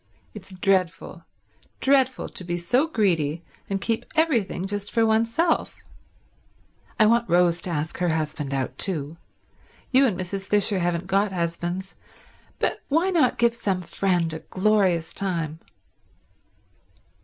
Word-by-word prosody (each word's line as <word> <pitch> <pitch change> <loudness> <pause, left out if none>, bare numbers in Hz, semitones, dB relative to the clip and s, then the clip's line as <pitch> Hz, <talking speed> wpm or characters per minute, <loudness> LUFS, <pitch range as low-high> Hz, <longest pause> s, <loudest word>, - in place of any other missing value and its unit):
It's 200 -2 -10
dreadful, 185 -2 -1 0.5
dreadful 265 -1 +2
to - - -6
be 175 0 -3
so 245 - +1
greedy 170 - 0 0.3
and 195 -1 -1
keep 225 +2 -1
everything 240 - +1
just 205 +1 -4
for 230 -1 +2
oneself. 230 +10 +1 1.2
I 215 - +6
want 235 +2 +2
Rose 175 0 +3
to - - -2
ask 155 -1 -3
her 180 -1 +1
husband 155 -3 -2
out 135 -2 -3
too. 160 -4 0 0.7
You 270 +1 +5
and 190 -6 -2
Mrs. 195 +2 -5
Fisher 205 -1 +3
haven't 175 0 -1
got 195 +2 +1
husbands, 175 +2 -3 0.6
but - - -1
why 330 +6 +2
not 315 -8 +2
give 235 0 +3
some 195 -5 -2
friend 175 -2 0
a 160 - -5
glorious 190 -4 +1
time?" 165 -5 -2
190 Hz, 130 wpm, -24 LUFS, 170-225 Hz, 1.2 s, I